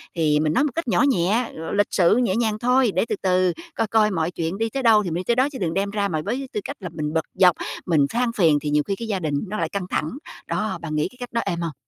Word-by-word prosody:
Thì 155 -3 +2
mình 155 0 +1
nói 270 - +3
một 295 - 0
cách 330 -6 -2
nhỏ 180 -6 +3
nhẹ, 225 0 +1
l 160 +4 -5
lịch 205 - +3
sự 180 +1 +4
nhẹ 235 -7 +1
nhàng 220 -2 0
thôi 250 -1 +3
để - - +2
từ - - 0
từ 185 -1 +2 0.2
coi 225 - 0
coi 215 -1 +3
mọi 165 -2 -1
chuyện 170 +2 -3
đi 225 +1 -1
tới 270 +4 -3
đâu 220 -3 +5
thì 180 - -3
mình 165 - -3
đi 180 - -2
tới 235 - +1
đó 260 +3 +3
chứ 270 - -7
đừng 170 -4 -1
đem 195 +2 0
ra 200 0 -1
mà 160 -5 -2
với 260 +5 -3
tư - - -1
cách - - -6
là 180 - -6
mình 155 -1 -3
bực 160 -1 0
dọc, 180 -2 +5 0.3
mình 155 -5 +3
than 240 0 0
phiền 165 -9 +4
thì 150 - -3
nhiều 150 0 +2
khi 195 - 0
cái 230 +3 -6
gia 205 -3 -1
đình 155 -4 -2
nó 210 +3 -4
lại - - -1
căng 195 -3 -4
thẳng. 155 - -1 0.4
Đó, 190 -4 -2
bạn 155 -2 -4
nghĩ 150 - +1
cái 250 - -19
cách 245 -1 -7
đó 230 - +1
êm 170 0 -2
hông? 165 -2 -3
195 Hz, 310 wpm, -23 LUFS, 165-225 Hz, 0.4 s, đâu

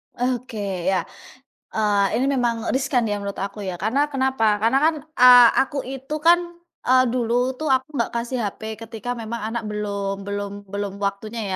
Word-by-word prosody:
Oke, 220 -7 -3
ya, 190 -1 +2 0.7
eee, 205 -2 +2
ini 255 - +1
memang 235 -3 0
riskan 260 -2 +1
ya 205 -1 -1
menurut 200 0 -5
aku 200 +2 -5
ya, 185 -3 -4
karena 270 +10 0
kenapa? 260 -6 +1
Karena 230 +6 +2
kan, 320 +1 +3 0.2
eee, 245 -2 +8
aku 275 +1 -2
itu 270 +3 -5
kan, 335 +3 +5 0.4
eee, 255 0 +4
dulu 245 +1 0
tuh 305 +3 -4
aku 260 +1 +2
nggak 235 -4 -1
kasih 235 +1 -3
HP 220 +1 -4
ketika 225 +1 -5
memang 230 -1 -5
anak 235 - -3
belum 200 -2 -3
belum 200 0 -5
belum 200 0 -4
waktunya 205 +3 -3
230 Hz, 165 wpm, -22 LUFS, 205-255 Hz, 0.7 s, eee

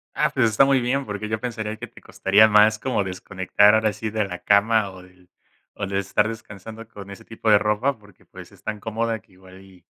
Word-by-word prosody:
Ah, - - +1
pues 115 - +1
está 110 +6 +4
muy 135 -1 +2
bien, 130 +3 -1
porque 105 0 -5
yo 110 0 -3
pensaría 110 -3 -5
que 120 - -8
te - - -17
costaría 105 +3 +3
más 105 0 +4
como 120 -7 -1
desconectar, 95 +2 +2
ahora 110 -1 +2
sí, 110 +2 -5
de 110 -1 -1
la 90 -2 -7
cama, 105 0 +2
o 95 -1 -13
del 90 0 -21 0.4
o 100 - -4
de 95 0 -2
estar 105 +2 0
descansando 110 0 -9
con 100 -3 -11
ese 115 +3 -11
tipo 115 0 -5
de 105 - +7
ropa 105 +6 0
porque, 105 -3 -22
pues, - - -13
es - - -20
tan 105 -1 -5
cómoda 110 0 -3
que - - -30
igual 95 +1 -16
y 95 -2 -20
105 Hz, 230 wpm, -22 LUFS, 100-110 Hz, 0.4 s, de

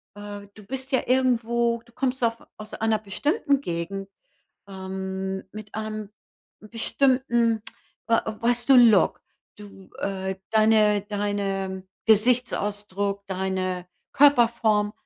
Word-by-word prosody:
äh, 205 0 -8
du 210 - -14
bist 265 +4 -5
ja 260 - +2
irgendwo, 235 -2 +1
du 235 - -23
kommst 260 -1 -2
auf 230 0 0
aus 215 0 -10
einer 220 -1 +1
bestimmten 280 - 0
Gegend, 195 0 -4 0.6
ähm, 190 0 -5
mit 215 -1 -10
einem 215 -1 -5 0.5
bestimmten, 235 +1 +1 0.5
äh, 230 0 +4 0.2
weißt 240 +2 +1
du, 270 - +9
Look. 230 -5 +5 0.4
Du, 200 -2 -14
äh 190 -1 -3
deine 215 -2 +4
deine 200 -2 -3 0.2
Gesichtsausdruck, 205 -3 +1
deine 185 -1 -2 0.3
Körperform, 235 -6 +4
215 Hz, 110 wpm, -25 LUFS, 195-235 Hz, 0.6 s, du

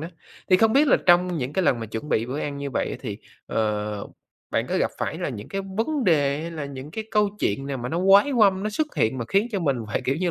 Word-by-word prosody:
đó, 165 - -5 0.4
thì 185 - +7
không 220 +2 +3
biết 285 +4 +5
là - - +6
trong 175 0 +4
những 130 +2 -3
cái 190 - +1
lần 120 -4 +2
mà 115 - -4
chuẩn 110 +7 -6
bị 115 -5 +1
bữa 135 +4 -4
ăn 145 -1 -3
như 140 -1 -4
vậy - - -1
á - - -4
thì, 105 -5 -5 0.3
ờ, 105 -1 -2 0.4
bạn - - 0
có - - 0
gặp - - +1
phải - - -3
là - - -2
những 105 - -7
cái 195 - -3 0.2
vấn 275 +5 0
đề 145 -5 +2
hay 165 +1 -5
là 155 -3 -5
những 140 +1 -8
cái 220 +6 -5
câu 210 -1 +3
chuyện 135 +7 -1
nào 140 -1 -3
mà 125 0 -5
nó 165 - -2
oái 195 +8 +5
oăm, 200 -6 +4
nó 215 - -1
xuất 305 +8 -2
hiện 110 +4 +1
mà 120 - -2
khiến 200 +3 +2
cho 195 - -1
mình 140 -5 +1
phải, 105 - -2
kiểu 135 - 0
như 175 +1 0
150 Hz, 285 wpm, -24 LUFS, 130-195 Hz, 0.4 s, thì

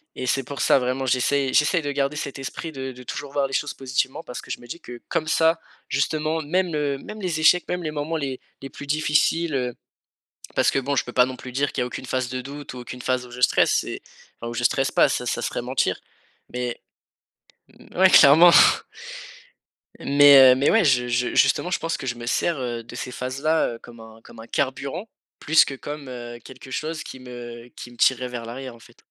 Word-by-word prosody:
Et 130 - -5
c'est 135 +2 +1
pour 140 +2 -6
ça, - - +4
vraiment 130 +1 -1
j'essaye 130 +2 +1
j'essaye 150 +4 +3
de 145 -1 -3
garder 140 +1 -1
cet 140 -2 -5
esprit 135 +4 -6
de 130 -2 -6
de 125 0 -12
toujours 140 +3 -6
voir 140 -1 +1
les 135 - -11
choses 145 - -1
positivement 130 +2 -2
parce 125 - -8
que - - -10
je - - -4
me 120 - -14
dis 170 - -7
que 120 -7 -11
comme 155 -2 -1
ça 160 +1 +2 0.3
justement, 155 +3 -1
même, 175 +2 0
heu, 145 -2 -1
même 215 - -9
les 170 -4 -2
échecs, 175 +3 +4
même 180 - -2
les 155 - -2
moments 155 +2 -3
les 135 -4 -4 0.2
les 135 - -7
plus 145 - -10
difficiles, 155 +1 +1
heu 125 -2 -1 0.8
parce - - +3
que - - 0
bon 140 +2 -1
je - - +1
peux 125 - -9
pas 125 - +5
non 130 0 -6
plus 125 - -9
dire 140 +3 0
qu'il 130 - -3
n'y - - +2
a - - -3
aucune 125 - -7
phase 130 -1 -2
de 130 0 -4
doute 140 +1 -9
ou - - -7
aucune 125 +1 -8
phase 130 0 -1
où 120 - -14
je 125 +1 -9
stresse, - - +4
c'est - - -7 0.4
enfin 115 - -6
où - - -6
je 120 +1 -3
stresse 135 +2 +1
pas, - - +4
ça, - - -2
ça - - -2
serait - - -3
mentir. - - 0 0.5
Mais 125 -1 -4 1.2
mouais, 190 +1 +6
clairement. 165 +3 +8 1.5
Mais 140 -2 +7
heu, - - 0
mais, 135 +2 +2
ouais, 225 -2 +4
je 125 -5 +3
je 125 0 -1
justement 180 - +3
je - - 0
pense 165 0 -2
que - - -8
je 120 - -2
me 120 0 -8
sers, 165 +7 0
heu, 120 -2 -4
de 120 - -11
ces 125 - -5
phases-là, 135 +2 -1
heu, - - -13
comme 120 0 -14
un 110 0 -14
comme 115 - -15
un 115 - -12
carburant 140 - -3 0.3
plus 160 +2 +5
que - - -6
comme, 145 +1 -8
heu, 120 -1 -8
quelque 130 0 -13
chose 155 +4 -3
qui 130 - -10
me 120 -1 -9
qui 120 - -9
me 120 - -17
tirerait 125 0 +2
vers 120 -2 -6
l'arrière, 125 +1 -7
en - - -18
fait. - - -19
135 Hz, 235 wpm, -23 LUFS, 125-150 Hz, 1.5 s, clairement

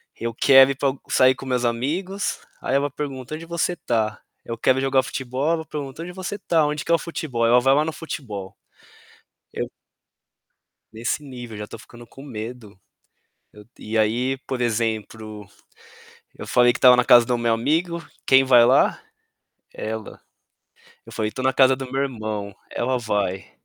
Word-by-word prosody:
eu 115 0 -3
quero 135 +3 +6
ir 135 - -1
pa 135 -1 +1 0.2
sair 130 0 +5
com 130 - -12
meus 125 -1 0
amigos, 165 - -2 0.2
aí 130 - -1
ela 140 +1 +1
pergunta: 135 -2 -6
"Onde 165 +2 -7
você 170 +1 -1
tá?", 110 -8 -2 0.2
eu 115 - -4
quero 130 +2 +3
jogar 135 0 +2
futebol? 130 +2 -3
Ela 160 -1 -2
pergunta: 145 +1 -6
"Aonde 175 - -7
você 190 +2 -5
tá? 165 -6 +1
Onde 150 0 -3
que - - -2
é - - +7
o - - -1
futebol?", 150 -8 -3
aí - - +3
ela 120 +1 +6
vai 135 +2 +4
lá 150 +2 +3
no 160 - -2
futebol. 105 -11 -7 1.0
Eu - - -3 1.2
Nesse 115 +6 -2
nível, 120 -5 -9
já 105 0 -6
tô 115 - -10
ficando 120 +2 -14
com 135 - -14
medo. 115 -5 -8 0.8
Eu 105 0 -14
e 110 +1 -4
aí 120 +5 +1
por 130 -2 -3
exemplo, 110 -2 -3 0.9
eu - - -8
falei 120 0 +4
que - - -5
estava 125 -1 +7
na 125 0 +2
casa 120 -1 +7
do 125 +1 0
meu 120 -1 +1
amigo, 165 +8 -1 0.2
quem 135 0 +6
vai 125 -3 +6
lá? 130 +3 +3 0.7
Ela. 110 -1 -6 0.9
Eu - - -12
falei 110 -1 -2
tô 130 - -6
na 130 0 +2
casa 130 0 +5
do 130 -1 -7
meu 135 +1 0
irmão, 110 -6 -4 0.2
ela 125 +1 -1
vai, 100 -5 -2
125 Hz, 180 wpm, -23 LUFS, 115-140 Hz, 1.2 s, é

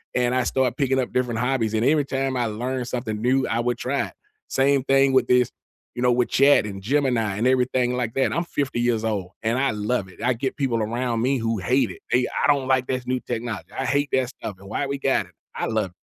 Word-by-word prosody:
and 125 0 +2
I 130 - +2
start 130 -1 0
picking 135 -2 +1
up 125 - -2
different 125 -3 0
hobbies, 125 -3 0
and 110 - +1
every 145 0 +3
time 135 -1 -1
I 120 - +1
learned 125 +3 -3
something 115 -4 -3
new, 130 +2 +2
I 115 - 0
would 120 +1 0
try 140 +2 -1
it. - - -15 0.4
Same 135 0 +2
thing 135 0 +3
with 130 -2 +3
this, 125 -1 +3 0.4
you 120 - -4
know, 125 - +4
with 120 0 +1
Chat 140 -2 +5
and 100 -1 -6
Gemini 120 -4 +1
and 115 +4 +1
everything 125 -1 +2
like 120 -3 -2
that. 135 - +2
I'm 170 - 0
50 140 -6 -2
years 115 -2 +1
old, 100 -5 -2
and 115 +2 +1
I 135 -2 +2
love 105 0 -1
it. - - -15
I 125 - +3
get 130 +3 -3
people 130 -5 0
around 115 +1 -1
me 135 +1 +2
who 115 0 -1
hate 130 +8 +2
it. - - -12
They, 125 0 +3 0.2
"I - - +4
don't 140 -3 +2
like 130 -1 +2
this 130 -1 -3
new 130 0 0
technology. 120 -2 -5
I 135 - -1
hate 145 +2 +1
that 130 -2 +2
stuff, 105 -6 -7
and 100 - -13
why 140 - -1
we 140 0 -3
got 135 -1 +1
it?" - - -22 0.2
I - - -2
love 110 -4 -1
it. - - -31
125 Hz, 250 wpm, -23 LUFS, 115-135 Hz, 0.4 s, Chat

